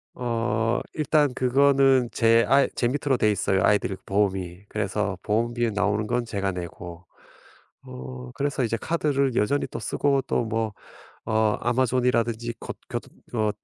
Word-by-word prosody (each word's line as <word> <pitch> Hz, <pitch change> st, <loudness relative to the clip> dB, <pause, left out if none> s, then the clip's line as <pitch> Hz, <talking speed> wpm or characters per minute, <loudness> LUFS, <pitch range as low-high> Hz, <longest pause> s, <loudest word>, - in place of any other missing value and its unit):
어 115 Hz, -1 st, 0 dB
일단 150 Hz, -3 st, +2 dB
그거는 135 Hz, -1 st, +4 dB
제 115 Hz, 0 st, +4 dB
아이 135 Hz, +2 st, +5 dB
제 120 Hz, -, +1 dB
밑으로 140 Hz, 0 st, 0 dB
되어 110 Hz, -, +3 dB
있어요 95 Hz, -2 st, +1 dB
아이들 105 Hz, -2 st, +2 dB
보험이. 95 Hz, -2 st, -1 dB
그래서 105 Hz, -2 st, -2 dB
보험비에 115 Hz, +2 st, 0 dB
나오는 105 Hz, +1 st, 0 dB
건 120 Hz, 0 st, 0 dB
제가 100 Hz, -3 st, -2 dB
내고. 90 Hz, 0 st, -8 dB, 0.8 s
어 125 Hz, 0 st, -8 dB
그래서 140 Hz, 0 st, -1 dB
이제 115 Hz, 0 st, 0 dB
카드를 140 Hz, -4 st, 0 dB
여전히 140 Hz, +7 st, +1 dB
또 -, -, -6 dB
쓰고 140 Hz, -2 st, +1 dB
또 -, -, 0 dB
뭐 110 Hz, -1 st, -2 dB, 0.5 s
어 110 Hz, -1 st, +2 dB
아마존이라든지 120 Hz, -2 st, +1 dB
곧 -, -, -6 dB
교 -, -, -1 dB, 0.4 s
어 110 Hz, -1 st, +2 dB
115 Hz, 295 characters per minute, -25 LUFS, 105-130 Hz, 0.8 s, 아이